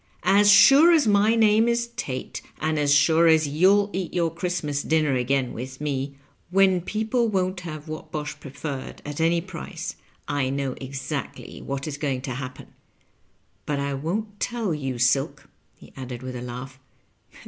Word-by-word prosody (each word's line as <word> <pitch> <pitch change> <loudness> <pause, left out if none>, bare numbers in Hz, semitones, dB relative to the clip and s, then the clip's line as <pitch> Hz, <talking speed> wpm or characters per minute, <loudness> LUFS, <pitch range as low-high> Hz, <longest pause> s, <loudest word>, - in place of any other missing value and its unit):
As 205 +1 +5
sure 275 +11 +8
as 320 -4 +4
my 210 +1 +4
name 220 0 +4
is 235 0 0
Tate, 130 -1 -5 0.2
and 155 0 0
as 145 -1 +2
snre 160 +3 +5
as 155 -1 0
yon'll 195 +7 +3
eat 185 -3 -3
yonr 170 -2 0
Christmas 165 -5 -2
dinner 155 -2 +1
again 130 0 0
with 130 +2 -7
me, 140 -1 -3 0.3
when 190 -1 +3
people 220 +5 0
won't 185 -3 -1
have 155 -3 -8
Whatbosh 155 -1 -5
Preferred 140 -1 -7
at 145 +2 -4
any 170 +1 +2
price, 175 -2 -7 0.3
I 145 -3 0
know 135 -1 -2
exactly 135 +2 -6
what 135 0 -4
is 145 -1 -5
going 135 -4 -2
to 135 - -4
happen. 130 0 -8 0.9
But 145 -1 -1
I 140 0 -2
won't 205 +9 -4
teU 235 -5 -2
you, 135 -5 -3
Silk," 125 +3 +1 0.3
he - - -17
added 130 -2 -7
with 130 0 -6
a 120 - -5
laugh. 125 +2 -8
155 Hz, 160 wpm, -24 LUFS, 135-190 Hz, 0.9 s, sure